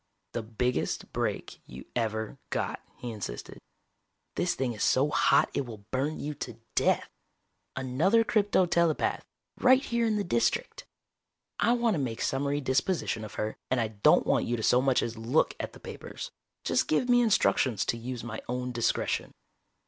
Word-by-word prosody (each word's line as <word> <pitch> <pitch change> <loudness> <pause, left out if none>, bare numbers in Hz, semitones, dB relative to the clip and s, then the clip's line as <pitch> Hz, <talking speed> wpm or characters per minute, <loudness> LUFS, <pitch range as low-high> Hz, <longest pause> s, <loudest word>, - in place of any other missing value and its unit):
"The 120 - -2
biggest 115 +3 -2
break - - -3
you - - -10
ever 110 -2 -2
got," - - -2 0.2
he 120 - -5
insisted. 100 - -6 0.7
"This 175 - 0
thing 130 -2 -1
is 105 - -8
so 140 +3 +3
hot - - +4
it 140 - -1
will 105 -4 -10
burn 140 +4 -1
you 150 +1 -3
to 115 - -5
death. - - +2 0.7
Another 145 - +2
crypto 205 -4 +3
telepath, 170 -2 +1 0.4
right 260 +1 +5
here 235 -1 +1
in 215 - +1
the 205 - 0
District. 120 -11 0 0.7
I 235 +4 +4
want 235 -2 +2
to 165 - -1
make 120 -4 -3
summary 140 +2 0
disposition 130 -2 0
of 105 - -8
her, 110 0 -3
and 130 - +2
I 110 -2 0
don't 105 -2 +4
want - - +2
you 120 +1 -1
to 110 - -4
so 125 +3 +4
much 130 -1 +2
as 115 -1 -4
look 120 +7 +2
at - - -4
the - - -13
papers. - - -8 0.3
Just - - +1
give 155 +11 +2
me 245 -1 +5
instructions 130 - +2
to - - 0
use 125 0 -5
my 115 -2 -5
own 125 0 -2
discretion." 120 -2 0
130 Hz, 170 wpm, -29 LUFS, 115-170 Hz, 0.7 s, right